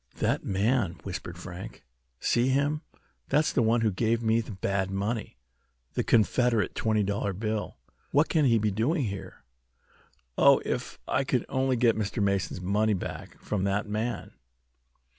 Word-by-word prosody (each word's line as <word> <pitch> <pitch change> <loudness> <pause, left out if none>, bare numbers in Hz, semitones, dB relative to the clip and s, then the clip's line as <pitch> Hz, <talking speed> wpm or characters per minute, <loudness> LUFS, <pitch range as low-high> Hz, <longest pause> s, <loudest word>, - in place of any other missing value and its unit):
"That - - 0
man!" 100 -1 +1
whispered 85 -3 -6
Frank. 90 +1 -9 0.4
"See 120 +1 +2
him! 140 +3 +1 0.5
That's 150 +1 +2
the 125 - +3
one 115 +1 +3
who 110 -2 +2
gave 115 +5 0
me 115 +1 +3
the 110 - -9
bad 95 0 -1
money 100 - -3 0.6
the - - 0
Confederate 115 0 +2
twenty 110 -1 +1
dollar 100 0 -1
bill. 110 +2 -3 0.3
What 145 +3 +3
can 155 -3 +2
he 115 -3 +4
be 105 -1 +1
doing 135 - +1
here? 100 -4 -6 1.0
Oh, - - +7
if - - -3
I - - +1
could - - 0
only 130 0 +1
get 115 -2 +3
Mr. 105 -1 -2
Mason's 100 -2 0
money 105 +3 +2
back 90 - -7
from 100 -3 -2
that 105 +2 0
man!" 110 +3 -3
110 Hz, 155 wpm, -28 LUFS, 100-120 Hz, 1.0 s, Oh